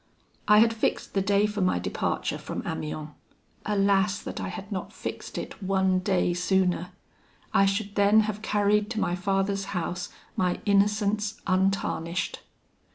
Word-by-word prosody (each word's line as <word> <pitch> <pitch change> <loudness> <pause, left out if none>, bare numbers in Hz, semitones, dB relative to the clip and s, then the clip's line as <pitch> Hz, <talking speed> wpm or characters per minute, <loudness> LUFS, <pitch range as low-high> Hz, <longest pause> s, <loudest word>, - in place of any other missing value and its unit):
"I 210 - +7
had 225 +1 +5
fixed 220 - -1
the 195 - +2
day 200 +1 +3
for 210 -1 -2
my 185 - +2
departure 90 - -2
from - - -5
Amiens. 155 0 -4 0.6
Alas! 200 -1 +2
that - - -5
I - - -3
had 200 +2 -7
not 190 -2 -4
fixed - - -6
it - - -6
one 190 -1 +2
day 185 -2 +1
sooner! 180 0 +1 0.6
I 195 - +5
should 200 +1 -1
then 205 +2 +5
have 215 -1 -3
carried 210 0 +2
to 225 -2 -2
my 175 - 0
father's 195 +1 0
house 180 +1 -3 0.3
my 180 -1 0
innocence 210 +2 +2
untarnished. 185 -2 0
195 Hz, 150 wpm, -27 LUFS, 185-210 Hz, 0.6 s, I